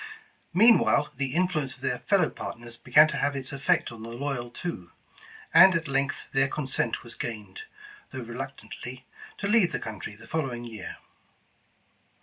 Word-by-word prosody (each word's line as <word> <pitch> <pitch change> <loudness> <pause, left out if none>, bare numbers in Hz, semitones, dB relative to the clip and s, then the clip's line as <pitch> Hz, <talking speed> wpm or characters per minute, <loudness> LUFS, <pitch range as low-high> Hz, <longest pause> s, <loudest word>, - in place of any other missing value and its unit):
Meanwhile 210 -8 +5
the 135 0 -2
influ 180 -3 +2
ence 135 -2 -6
of - - -19
their 125 -2 -1
fellow 180 +10 +2
partners 120 0 -7
began 145 +6 +6
to - - -3
have 145 - 0
its 135 0 -5
effect 135 -2 +1
on 115 -1 -10
the 115 - -7
loyal 125 0 -3
two, 120 - -6 0.6
and 180 +2 +9
at 165 -1 -1
length 135 0 -1
their 135 0 +3
consent 130 -5 -2
was 120 - -10
gained, 120 - -6 0.4
though 130 -2 -6
reluctantly, 130 +1 -8 0.3
to 200 - -2
leave 205 -5 +4
the - - -1
country 105 -1 -7
the - - -14
following 135 -7 -2
year. 110 -5 -8
135 Hz, 160 wpm, -27 LUFS, 120-155 Hz, 0.6 s, and